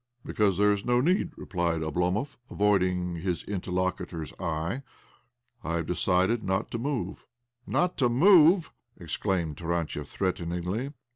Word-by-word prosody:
" 120 Hz, -, -38 dB
Because 100 Hz, -4 st, +1 dB
there 105 Hz, +1 st, +4 dB
is 100 Hz, -1 st, -1 dB
no 120 Hz, 0 st, +2 dB
need," 180 Hz, -, +2 dB
replied 85 Hz, -3 st, -1 dB
Oblo 85 Hz, +3 st, 0 dB
movj 135 Hz, +9 st, -3 dB
avoiding 90 Hz, -4 st, +1 dB
his 90 Hz, +1 st, -2 dB
interlocutor's 90 Hz, -4 st, -3 dB
eye. 85 Hz, +7 st, -2 dB, 0.4 s
" 120 Hz, -1 st, -42 dB
I 85 Hz, -1 st, -2 dB
have 85 Hz, -1 st, -1 dB
decided 90 Hz, +6 st, +1 dB
not 95 Hz, +2 st, -1 dB
to 115 Hz, -, -3 dB
move." 120 Hz, -8 st, -3 dB, 0.4 s
"Not 180 Hz, 0 st, +1 dB
to 125 Hz, -3 st, +3 dB
move? 170 Hz, +5 st, +6 dB
" 120 Hz, -1 st, -32 dB
exclaimed 85 Hz, -2 st, -2 dB
Tarantiev 85 Hz, -4 st, -2 dB
threateningly. 90 Hz, -, -2 dB
95 Hz, 145 wpm, -28 LUFS, 85-120 Hz, 0.4 s, move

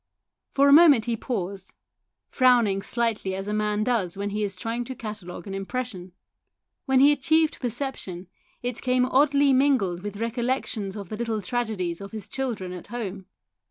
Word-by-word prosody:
For 280 Hz, 0 st, +5 dB
a 280 Hz, -, +7 dB
moment 290 Hz, -8 st, +7 dB
he 235 Hz, -1 st, 0 dB
paused, 195 Hz, -5 st, -5 dB, 0.6 s
frowning 240 Hz, -7 st, +4 dB
slightly 220 Hz, -4 st, -1 dB
as 195 Hz, +1 st, -5 dB
a 210 Hz, -, -2 dB
man 210 Hz, 0 st, 0 dB
does 215 Hz, -7 st, 0 dB
when 200 Hz, 0 st, -3 dB
he 210 Hz, +1 st, -1 dB
is 200 Hz, -2 st, -3 dB
trying 230 Hz, +4 st, -3 dB
to 260 Hz, +1 st, -6 dB
catalogue 210 Hz, -8 st, -7 dB
an 195 Hz, -, -6 dB
impression. 195 Hz, -2 st, -5 dB, 0.7 s
When 265 Hz, -2 st, +3 dB
he 280 Hz, +2 st, +7 dB
achieved 315 Hz, +3 st, +2 dB
perception, 240 Hz, -8 st, -4 dB, 0.4 s
it 245 Hz, -1 st, -2 dB
came 250 Hz, 0 st, +2 dB
oddly 280 Hz, +1 st, +4 dB
mingled 255 Hz, -10 st, +2 dB
with 205 Hz, 0 st, -6 dB
recollections 230 Hz, -3 st, -2 dB
of 200 Hz, -4 st, -7 dB
the 215 Hz, -, -5 dB
little 230 Hz, -1 st, -2 dB
tragedies 200 Hz, -6 st, -2 dB
of 200 Hz, +1 st, -9 dB
his 215 Hz, -3 st, -7 dB
children 225 Hz, -9 st, -4 dB
at 180 Hz, -, -9 dB
home. 200 Hz, -5 st, -6 dB
225 Hz, 165 wpm, -25 LUFS, 195-255 Hz, 0.7 s, a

